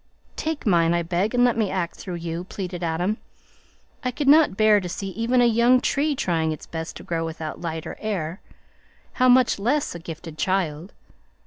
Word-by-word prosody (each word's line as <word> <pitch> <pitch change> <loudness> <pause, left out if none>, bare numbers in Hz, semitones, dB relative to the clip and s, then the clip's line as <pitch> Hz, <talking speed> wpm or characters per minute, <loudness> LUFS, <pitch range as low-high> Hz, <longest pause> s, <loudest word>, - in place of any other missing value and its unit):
"Take 315 -1 -3
mine, 170 -4 +3
I 170 - 0
beg, 185 +7 -1
and 245 - +4
let 245 -2 +4
me 220 -4 0
act 180 -3 -2
through 180 -3 -6
you," 170 +1 -4
pleaded 180 -2 -6
Adam. 175 +6 0 0.9
"I 255 - 0
could 275 +3 -3
not 295 -8 +6
bear 215 -1 +5
to 180 -2 -5
see 195 +2 -4
even 230 +5 +1
a - - +5
young 235 +2 +4
tree 285 +3 0
trying 165 -8 0
its 155 - -6
best 160 0 -6
to - - -9
grow 165 -1 -2
without 160 -1 -5
light 160 -2 -4
or - - -6
air, 185 -4 -3 0.8
how 255 - +6
much 250 -4 +4
less 275 +8 0
a 170 - -7
gifted 165 -1 -9
child! 180 -2 -1
185 Hz, 195 wpm, -24 LUFS, 165-235 Hz, 0.9 s, not